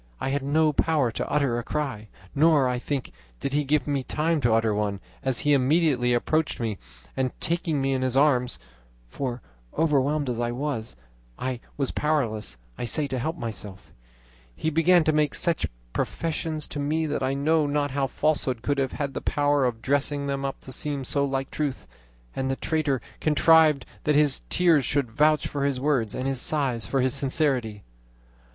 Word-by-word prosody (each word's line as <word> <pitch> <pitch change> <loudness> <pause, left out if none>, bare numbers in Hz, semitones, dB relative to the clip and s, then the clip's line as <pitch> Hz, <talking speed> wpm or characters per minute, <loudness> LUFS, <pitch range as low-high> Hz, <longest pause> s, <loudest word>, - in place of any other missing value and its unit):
I - - -2
had 140 +1 0
no 150 +3 +2
power 145 -6 +2
to - - -4
utter 140 -5 +1
a - - -5
cry, 130 -7 -3 0.3
nor, 150 -2 +4
I 125 -1 -1
think, 135 0 -3 0.3
did 140 - -3
he 150 +1 +2
give 150 +1 +1
me 145 -2 0
time 155 +4 0
to 120 - +2
utter 110 -1 +2
one, 105 -1 -1 0.2
as 130 -2 0
he 145 -1 +3
immediately 135 -2 +3
approached 155 +6 0
me, 110 -4 -3 0.4
and 130 -1 -2
taking 165 -3 +1
me 135 0 +1
in 130 - -1
his 130 0 0
arms 130 - +3 0.5
(for, 125 - -4 0.3
overwhelmed 145 -1 +2
as 120 -2 -2
I 120 0 -1
was, 125 - -3 0.4
I 130 -2 -3 0.2
was 140 -3 0
powerless, 115 - -1 0.2
I - - -3
say, 145 +5 0
to 130 - -2
help 160 +7 -2
myself), 105 - -6 0.6
he 160 - -1
began 165 +2 +4
to 155 - +2
make 150 -2 +1
such 170 -2 +1 0.3
professions 160 -1 -2
to 145 - -5
me 155 +3 0
that 150 -2 -2
I 130 +1 0
know 155 +2 +2
not 145 0 0
how 135 0 0
falsehood 135 -5 0
could 145 0 0
have 135 -1 -1
had 140 -2 -3
the - - -4
power 145 -2 +1
of 115 -2 -2
dressing 140 +1 0
them 140 -1 -2
up 135 0 -3
to 130 - -10
seem 140 0 -1
so 140 +2 +1
like 135 -1 -2
truth; 140 - -3 0.5
and 130 0 -1
the 135 - 0
traitor 150 -3 -1 0.2
contrived 155 -2 +4 0.2
that 150 - +3
his 145 -2 +3
tears 170 -5 +4
should 130 -1 -1
vouch 150 +4 +3
for 140 -1 -3
his 140 -2 0
words, 130 -7 0
and 130 - -3
his 135 -2 -1
sighs 130 -8 0
for 135 +2 +1
his 130 0 +1
sincerity. 130 -7 0
140 Hz, 185 wpm, -25 LUFS, 125-150 Hz, 0.6 s, nor